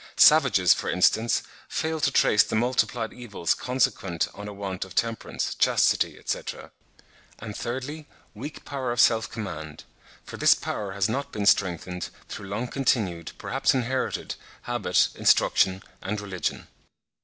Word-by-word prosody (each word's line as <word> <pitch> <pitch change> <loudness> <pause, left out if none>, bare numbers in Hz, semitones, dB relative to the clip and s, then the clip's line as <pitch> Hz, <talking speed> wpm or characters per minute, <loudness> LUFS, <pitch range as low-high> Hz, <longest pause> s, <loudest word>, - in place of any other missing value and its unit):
Savages, - - +6
for - - -4
instance, 110 +5 +2 0.3
fail 160 0 -2
to 140 - +2
trace 105 -5 +4
the - - -1
multiplied 120 0 0
evils 105 -9 -1
consequent 110 -9 0
on 105 0 -8
a - - -6
want 100 -2 -4
of 95 - -12
temperance, 115 -1 -1
chastity, - - +2
etc. - - -5 0.7
And, 105 -1 -8
thirdly, 135 +5 -5 0.3
weak 140 +8 -8
power 130 -3 -3
of 120 - -3
self 115 -1 +4
command; 80 -9 -7 0.4
for - - -9
this - - +6
power 100 -2 -4
has 100 0 +1
not 135 +6 -3
been 105 -1 -3
strengthened 90 -2 +1 0.2
through 100 - -7
long 110 +5 -2
continued, 105 - -1
perhaps - - 0
inherited, 130 +1 -1 0.3
habit, 110 -7 +2
instruction 95 0 +3 0.2
and 105 +2 -3
religion. 95 -5 -4
110 Hz, 140 wpm, -26 LUFS, 95-125 Hz, 0.7 s, Savages